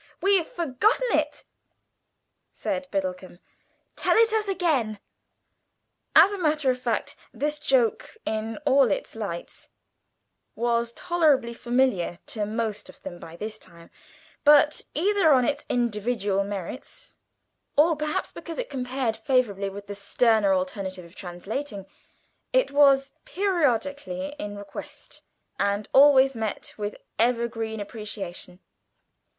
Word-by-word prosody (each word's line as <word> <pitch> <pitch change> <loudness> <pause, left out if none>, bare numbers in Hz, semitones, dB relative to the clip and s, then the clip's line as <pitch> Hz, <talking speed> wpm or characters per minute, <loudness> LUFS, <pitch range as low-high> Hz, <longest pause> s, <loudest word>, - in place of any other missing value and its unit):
"We've 390 -4 +3
forgotten 380 - +1
it," - - -1 1.1
said 275 -2 -3
Biddlecomb: 185 -3 -3 0.6
"tell - - +2
it 450 -1 +5
us 435 -1 +1
again." 300 - 0 1.2
As 400 - +8
a 405 - -4
matter 305 -5 +2
of 250 - -4
fact - - -2 0.2
this 300 +1 -2
joke, 260 -6 +1
in 220 +1 -2
all 270 -3 +5
its 200 - -3
lights, 200 -6 -6 0.9
was 235 0 0
tolerably 310 -9 +2
familiar 240 -8 0 0.2
to 210 -2 -2
most 220 -1 -3
of - - -14
them 175 -2 -7
by 165 0 -10
this 215 +4 -6
time, 170 0 -15 0.5
but, 295 +1 +6
either 375 +1 +3
on 255 -3 +5
its 285 +1 -2
individual 210 -4 0
merits, 205 - -7 0.6
or 320 +3 +5
perhaps 305 0 -2
because 330 - -8
it - - -4
compared 250 -3 -2
favourably 220 -4 0
with 200 +1 -9
the 205 - -6
sterner 205 +1 +2
alternative 185 -1 -2
of 170 +3 -17
translating, 195 +4 -5 0.7
it - - +2
was 275 -1 +5
periodically 285 - -1
in 205 -4 -5
request, 200 -1 -9 0.4
and 200 +1 0
always 270 -1 +7
met 220 -3 -4
with 210 0 -4 0.2
evergreen 230 -2 0
appreciation. 200 -4 -7
240 Hz, 120 wpm, -26 LUFS, 205-290 Hz, 1.2 s, As